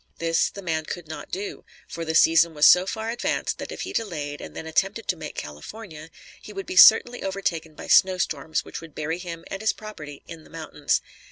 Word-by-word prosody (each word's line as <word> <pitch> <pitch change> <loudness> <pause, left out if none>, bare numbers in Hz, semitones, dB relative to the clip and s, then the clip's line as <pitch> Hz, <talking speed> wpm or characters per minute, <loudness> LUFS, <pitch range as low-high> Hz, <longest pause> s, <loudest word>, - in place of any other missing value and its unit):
This, 165 0 +1
the 200 - -10
man 160 -3 -1
could 175 -1 -6
not 155 - -8
do; 200 +2 -5 0.2
for 170 - -6
the 160 0 -2
season 165 0 +5
was 150 0 +4
so 180 +1 +7
far 220 +3 -3
advanced 240 - -2
that - - -6
if - - -6
he - - -5
delayed, 150 -9 -3
and - - -9
then - - -6
attempted 195 +7 -1
to 185 - +2
make 155 -3 -8
California, 155 - -8 0.3
he - - -10
would 195 -1 -6
be - - -6
certainly 240 +5 +7
overtaken 170 -5 -3
by - - -9
snow 185 -1 +5
storms 160 -2 -2
which - - -7
would 165 -2 -13
bury 160 +3 -3
him 170 -2 -7
and 195 - -4
his 220 - +2
property 155 -10 -10
in 165 -2 -10
the - - -18
mountains. 155 -3 -1
165 Hz, 215 wpm, -25 LUFS, 160-195 Hz, 0.3 s, so